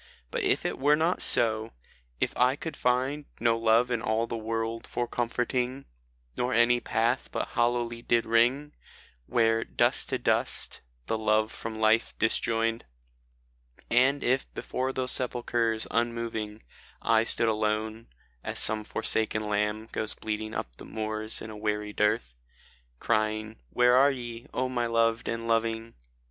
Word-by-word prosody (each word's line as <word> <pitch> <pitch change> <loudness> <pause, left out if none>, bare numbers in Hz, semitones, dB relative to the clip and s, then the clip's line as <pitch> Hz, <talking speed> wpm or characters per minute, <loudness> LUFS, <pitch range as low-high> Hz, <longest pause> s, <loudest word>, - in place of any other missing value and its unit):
But - - -1
if - - +1
it - - -2
were 145 +2 +4
not 165 +4 0
so, 110 -1 +2 0.2
— - - -36
if - - -1
I 125 +2 +3
could 160 +2 -6
find 130 +4 0
No 115 0 +3
love 115 +2 +3
in 120 -2 0
all 110 0 0
the 115 - -5
world 115 0 -3
for 120 0 -2
comforting, 125 +2 -2 0.5
Nor 125 0 -1
any 120 +1 +4
path 115 0 0
but - - -3
hollowly 120 0 0
did 120 -1 +1
ring, 125 +6 +2 0.5
Where 115 -1 +2
"dust - - +1
to - - 0
dust"the - - -2
love 110 0 +2
from 110 -1 -6
life 110 +1 +2
disjoined 115 0 0 1.1
And 130 +4 +3
if 130 +2 0
before 130 +1 -2
those 130 -1 -1
sepulchres 120 -3 0
unmoving 115 -2 -2 0.4
I 110 -1 +3
stood 115 0 +3
alone 110 +1 -1 0.4
(as - - -4
some 110 0 +5
forsaken 110 0 0
lamb 105 +1 -1
Goes 110 - -3
bleating 110 0 -4
up - - -5
the - - -11
moors 110 0 -3
in 110 -1 -8
weary 105 0 -2
dearth), 105 - +1 0.7
Crying, 110 0 -1
" - - -39
Where 125 - +4
are 135 +2 +6
ye, 120 -3 -6
O 130 +1 -1
my 120 -2 -1
loved 115 0 +1
and 115 0 -3
loving?" 115 0 0
115 Hz, 150 wpm, -28 LUFS, 110-120 Hz, 1.1 s, are